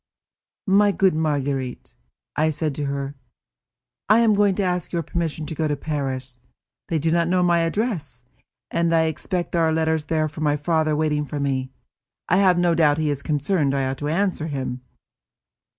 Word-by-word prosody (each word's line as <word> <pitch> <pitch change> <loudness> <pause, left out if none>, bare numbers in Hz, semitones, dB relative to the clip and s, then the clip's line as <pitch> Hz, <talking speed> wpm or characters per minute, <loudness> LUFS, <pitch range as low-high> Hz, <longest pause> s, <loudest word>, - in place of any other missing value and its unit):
"My 200 0 +4
good 190 -1 +3
Marguerite," 140 -5 -2 0.4
I 155 +1 +2
said 155 -1 -1
to 145 +1 -3
her, 140 0 -3 1.0
"I 220 +2 +6
am 225 -2 +4
going 200 -1 +3
to 200 - 0
ask 180 -2 -1
your 170 -2 -1
permission 160 -1 -3
to 150 - -5
go 155 0 -1
to 145 - 0
Paris. 135 -4 -4 0.5
They 165 - 0
do 160 +2 0
not 170 0 +2
know 180 +1 +2
my 175 -1 +3
address, 165 - -2 0.5
and 170 0 +1
I 160 - +4
expect 175 +3 -2
there 170 - +1
are 160 -1 +3
letters 160 -1 +1
from 155 0 -1
my 145 -1 +2
father 155 0 +1
waiting 150 -1 0
for 145 0 -5
me. 135 -2 -1 0.6
I 180 - +3
have 185 -2 +4
no 175 -1 +3
doubt 150 -3 +3
he 155 -2 0
is 140 -1 -3
concerned; 150 -1 0
I 135 -1 0
ought 130 0 -3
to 145 - -3
answer 170 -1 0
him." 130 -4 -4
155 Hz, 180 wpm, -23 LUFS, 145-175 Hz, 1.0 s, I